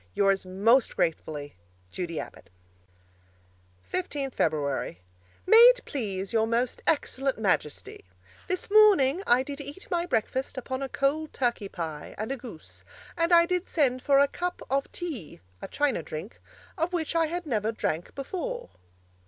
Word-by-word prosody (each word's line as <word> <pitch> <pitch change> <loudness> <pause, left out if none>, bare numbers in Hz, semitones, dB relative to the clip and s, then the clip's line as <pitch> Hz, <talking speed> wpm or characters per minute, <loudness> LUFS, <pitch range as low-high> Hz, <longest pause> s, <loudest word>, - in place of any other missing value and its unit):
Yours 195 -1 +2
most 225 +7 +3
gratefully, 150 - -2 0.3
Judy 170 -3 -4
Abbott - - -9 1.4
15th 285 -7 -2
Feb. 145 - -1 0.5
May 445 +4 +7
it - - +8
please 200 -7 -4
Your 225 -1 +3
Most 235 +2 0
Excellent 275 -3 0
Majesty: 150 - -1 0.4
This 370 +2 -3
morning 385 -8 +6
I 245 +2 +5
did 285 +1 -6
eat 285 +7 -9
my 345 0 0
breakfast 260 +2 -1
upon 260 +1 -4
a 270 - -3
cold 295 +4 0
turkey 240 -6 -1
pie 160 -5 -6
and 215 +4 -3
a - - 0
goose, 230 -10 -11 0.3
and 335 0 +1
I 340 0 +7
did 360 +1 -2
send 260 -5 +2
for 275 +1 +4
a 280 +1 +6
cup 355 +4 -4
of 275 +1 0
tee 295 - -6 0.2
(a - - -5
china 290 -9 0
drink) 160 +7 -8 0.4
of 335 +3 0
which 330 -2 -1
I 330 -1 +3
had 350 +2 -4
never 220 -6 0
drank 170 -6 -3
before. 435 - -5
265 Hz, 150 wpm, -27 LUFS, 200-330 Hz, 1.4 s, it